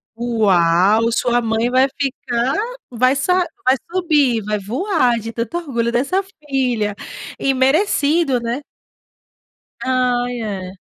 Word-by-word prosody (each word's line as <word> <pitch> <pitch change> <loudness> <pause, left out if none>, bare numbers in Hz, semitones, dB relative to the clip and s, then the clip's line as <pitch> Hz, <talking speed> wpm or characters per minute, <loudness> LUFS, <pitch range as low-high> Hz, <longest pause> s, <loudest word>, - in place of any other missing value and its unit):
Uau, 210 -2 +3
sua 240 +1 +1
mãe 225 +2 0
vai 260 +1 +4
ficar, 255 -2 -1 0.4
vai 255 +3 +2
sa 360 +6 +2 0.2
vai 255 - +5 0.2
subir, 295 - +2
vai 210 -1 -1
voar 250 - 0
de 225 +1 -6
tanto 230 +8 -3
orgulho 235 -8 -2
dessa 275 +11 +1 0.3
filha 245 -7 0 0.4
e 275 - +1
merecido, 285 0 +2
né? 235 +4 -3 1.2
Ai, 245 -2 0
é. 190 -3 -5
245 Hz, 115 wpm, -19 LUFS, 225-275 Hz, 1.2 s, vai